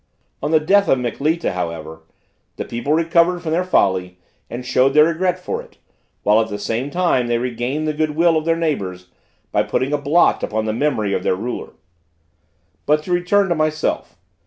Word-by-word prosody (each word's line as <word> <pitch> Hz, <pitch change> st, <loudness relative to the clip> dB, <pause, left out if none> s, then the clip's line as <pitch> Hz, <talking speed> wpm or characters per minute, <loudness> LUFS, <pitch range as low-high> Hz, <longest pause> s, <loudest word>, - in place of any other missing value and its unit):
On 150 Hz, -, -1 dB
the 160 Hz, 0 st, +4 dB
death 195 Hz, +6 st, +3 dB
of -, -, +3 dB
Mikleta, 145 Hz, +7 st, -1 dB
however, 80 Hz, -3 st, -5 dB, 0.5 s
the -, -, -5 dB
people 120 Hz, +5 st, -3 dB
recovered 170 Hz, +2 st, +2 dB
from 160 Hz, -, -3 dB
their 175 Hz, +3 st, +1 dB
folly, 95 Hz, -, +1 dB, 0.3 s
and 120 Hz, +2 st, -6 dB
showed 130 Hz, +2 st, +2 dB
their 150 Hz, 0 st, +7 dB
regret 180 Hz, +2 st, 0 dB
for 180 Hz, -, -4 dB
it, -, -, -19 dB, 0.5 s
while 105 Hz, +2 st, +4 dB
at 110 Hz, -, -2 dB
the 105 Hz, -, -4 dB
same 115 Hz, +6 st, -3 dB
time 170 Hz, -7 st, +1 dB
they 120 Hz, 0 st, +1 dB
regained 125 Hz, +5 st, -2 dB
the 155 Hz, -, 0 dB
good 155 Hz, 0 st, -1 dB
will 165 Hz, +1 st, +3 dB
of 155 Hz, 0 st, 0 dB
their 165 Hz, 0 st, +2 dB
neighbors, 95 Hz, -, -3 dB, 0.4 s
by -, -, +2 dB
putting 135 Hz, +3 st, -1 dB
a 150 Hz, -, +1 dB
blot 145 Hz, +5 st, +3 dB
upon 110 Hz, 0 st, -2 dB
the 110 Hz, -, -1 dB
memory 110 Hz, -6 st, 0 dB
of -, -, 0 dB
their -, -, +1 dB
ruler. 120 Hz, +6 st, -5 dB, 1.1 s
But, 150 Hz, +1 st, +3 dB
to 180 Hz, -, -6 dB
return 180 Hz, +3 st, +2 dB
to -, -, +3 dB
myself. 155 Hz, -, -1 dB
150 Hz, 190 wpm, -20 LUFS, 115-165 Hz, 1.1 s, their